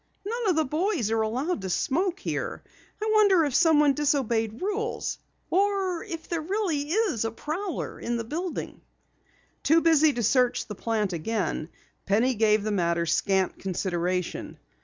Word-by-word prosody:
"None 460 Hz, 0 st, -1 dB
of 360 Hz, -, +3 dB
the 315 Hz, 0 st, +2 dB
boys 310 Hz, -, 0 dB
are 225 Hz, 0 st, +2 dB
allowed 250 Hz, -, -1 dB
to 190 Hz, -, -4 dB
smoke 345 Hz, -, 0 dB
here. -, -, -4 dB, 0.4 s
I 430 Hz, -, -2 dB
wonder 400 Hz, -6 st, +5 dB
if 285 Hz, -, -2 dB
someone 300 Hz, -3 st, +5 dB
disobeyed 240 Hz, -7 st, 0 dB
rules, 420 Hz, +4 st, -2 dB, 0.3 s
or 385 Hz, -1 st, +1 dB
if 335 Hz, -7 st, -7 dB
there's 330 Hz, -1 st, -3 dB
really 335 Hz, -8 st, -1 dB, 0.3 s
a 225 Hz, -, 0 dB
prowler 320 Hz, -, -4 dB
in 240 Hz, 0 st, -2 dB
the 230 Hz, -, -3 dB
building?" 330 Hz, +9 st, -5 dB, 0.8 s
Too 320 Hz, +3 st, +4 dB
busy 315 Hz, -2 st, +5 dB
to 240 Hz, -, -2 dB
search 250 Hz, +3 st, +2 dB
the 210 Hz, -, -7 dB
plant 210 Hz, -2 st, -1 dB
again, 175 Hz, -2 st, -2 dB, 0.4 s
Penny 225 Hz, +6 st, +3 dB
gave 215 Hz, -2 st, +3 dB
the 215 Hz, -, -1 dB
matter 170 Hz, -3 st, +1 dB
scant 190 Hz, +3 st, +1 dB
consideration. 180 Hz, -1 st, -2 dB
280 Hz, 150 wpm, -26 LUFS, 215-350 Hz, 0.8 s, wonder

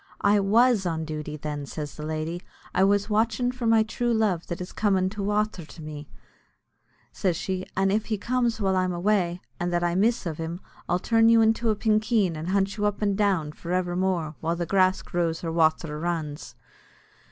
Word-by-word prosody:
"I 205 Hz, +1 st, +5 dB
was 215 Hz, 0 st, +3 dB
on 160 Hz, -1 st, -2 dB
duty, 150 Hz, -1 st, -5 dB
then," 145 Hz, -1 st, -5 dB
says 150 Hz, -1 st, -6 dB
the 150 Hz, -, -8 dB
lady; 155 Hz, +3 st, -3 dB, 0.3 s
"I 185 Hz, -, +3 dB
was 205 Hz, +1 st, +3 dB
watchin' 225 Hz, +3 st, +1 dB
for 250 Hz, -2 st, -3 dB
my 225 Hz, -1 st, +5 dB
true 240 Hz, +2 st, -2 dB
love 200 Hz, -6 st, 0 dB
that 170 Hz, +1 st, -4 dB
is 180 Hz, 0 st, -6 dB
comin' 190 Hz, -3 st, +1 dB
by 205 Hz, +1 st, -6 dB
wather 210 Hz, -2 st, -1 dB
to 160 Hz, +1 st, -12 dB
me," 150 Hz, -1 st, -8 dB, 1.0 s
says 180 Hz, -4 st, -1 dB
she, 185 Hz, +1 st, -3 dB
"an' 195 Hz, 0 st, +2 dB
if 215 Hz, +2 st, 0 dB
he 215 Hz, -, -1 dB
comes 240 Hz, +1 st, 0 dB
while 195 Hz, -2 st, +1 dB
I'm 185 Hz, -1 st, +1 dB
away, 180 Hz, -1 st, 0 dB, 0.2 s
an' 175 Hz, -, -1 dB
that 175 Hz, 0 st, 0 dB
I 175 Hz, 0 st, +1 dB
miss 220 Hz, +5 st, +1 dB
iv 160 Hz, -2 st, -4 dB
him, 165 Hz, +2 st, -4 dB, 0.3 s
I'll 175 Hz, -, +3 dB
turn 225 Hz, +4 st, +3 dB
you 230 Hz, -1 st, +6 dB
into 225 Hz, +1 st, +2 dB
a 215 Hz, -, +2 dB
pinkeen, 215 Hz, -4 st, +1 dB
and 155 Hz, +2 st, -5 dB
I'll 185 Hz, -, -1 dB
hunt 200 Hz, +1 st, +1 dB
you 210 Hz, 0 st, +1 dB
up 205 Hz, +1 st, -2 dB
and 200 Hz, -1 st, +1 dB
down 190 Hz, -7 st, +1 dB
for 170 Hz, +3 st, -6 dB
evermore, 180 Hz, -3 st, 0 dB
while 165 Hz, +1 st, -1 dB
grass 185 Hz, 0 st, +2 dB
grows 170 Hz, -2 st, -2 dB
or 165 Hz, -, -2 dB
wather 160 Hz, -2 st, +1 dB
runs." 160 Hz, -3 st, -4 dB
185 Hz, 200 wpm, -26 LUFS, 165-215 Hz, 1.0 s, you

